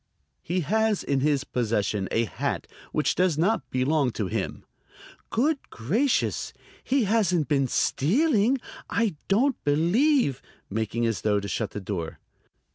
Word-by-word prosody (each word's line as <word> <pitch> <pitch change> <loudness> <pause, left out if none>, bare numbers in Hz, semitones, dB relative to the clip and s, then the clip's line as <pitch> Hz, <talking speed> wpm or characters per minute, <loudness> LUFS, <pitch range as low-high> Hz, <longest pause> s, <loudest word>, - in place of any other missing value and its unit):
"He 180 +2 -1
has 220 +5 +1
in 140 -1 0
his 145 0 +1
possession 105 -6 -1
a 115 +1 +1
hat 95 - -3 0.3
which 155 - +1
does 180 -4 +1
not 200 +8 +1
belong 135 +2 +1
to 105 - -2
him." 90 - -3 0.6
"Good 280 +5 +1
gracious, 215 - 0 0.3
he 265 -1 +2
hasn't 190 -7 +2
been 140 -3 +2
stealing? 230 - +2 0.3
I 225 -7 0
don't 250 +7 +2
believe" 170 - +2 0.3
making 110 +2 -1
as 115 -3 -1
though 105 -1 +2
to 100 - -5
shut 110 +1 -2
the - - -6
door. 90 -4 -4
150 Hz, 135 wpm, -26 LUFS, -, 0.6 s, he